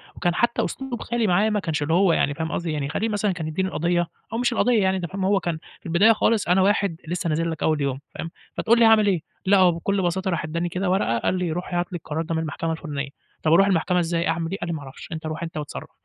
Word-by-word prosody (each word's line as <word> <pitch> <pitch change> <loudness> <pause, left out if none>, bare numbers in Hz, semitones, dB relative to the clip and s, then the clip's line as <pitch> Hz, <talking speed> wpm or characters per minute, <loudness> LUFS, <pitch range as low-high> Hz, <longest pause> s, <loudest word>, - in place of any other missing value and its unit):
وكان 175 0 0
حتى 235 0 +1
أسلوب 265 -3 -5
خالي 235 -2 0
معايا 200 +4 +3
ما 210 -1 +1
كانش 160 -5 -2
اللّي 160 +3 0
هو 185 -1 +4
يعني، 145 - +1
فاهم 160 +2 -3
قصدي، 170 -1 -2
يعني 145 -2 -2
خالي 225 +9 -1
مثلًا 205 -1 0
كان 165 -3 -4
يدّيني 190 +4 -1
القضية 175 0 0 0.3
أو 230 - -1
مش 245 0 +1
القضية 235 -4 +3
يعني 190 0 +2
أنت 175 - -3
فاهم، 190 +2 -3
هو 200 +1 +3
كان 170 -3 -2 0.2
في - - -35
البداية 180 +7 +5
خالص 220 -2 +1
أنا 185 +2 +4
واحد 200 -2 +2
لسّه 175 +1 -2
نازِل 165 +2 0
لَك 160 - -4
أوّل 155 -2 +2
يوم، 135 -1 -1 0.2
فاهم، 165 - -5 0.3
فتقول 235 +1 +3
لي 230 - +6
هاعمل 220 -2 +6
إيه، 185 -5 +2 0.2
لأ، 200 +1 +5
هو 185 -2 +6
بكل 190 +4 -1
بساطة 190 +2 0
راح 170 - -1
ادّاني 170 +2 -2
كده 180 +2 -1
ورقة، 180 - +1
قال 185 - 0
لي: 180 -2 -1
"روح 180 +2 -4
هات 175 +1 -1
لي - - -4
القرار 160 0 -4
ده 165 0 -3
من 160 - 0
المحكمة 160 +1 -3
الفُلانية." 145 -3 -4 0.3
"طب 160 0 +3
أروح 195 +3 +6
المحكمة 180 -1 +2
إزاي؟ 170 0 0
أعمل 165 0 -1
إيه؟" 195 - -2
قال 175 - -4
لي: 170 - -1
"ما 150 - -5
أعرفش، 135 -1 -11
أنت 160 -1 -5
روح 155 +1 -4
أنت 165 -1 -6
واتصرّف." 150 -1 -6
175 Hz, 275 wpm, -24 LUFS, 160-195 Hz, 0.3 s, لي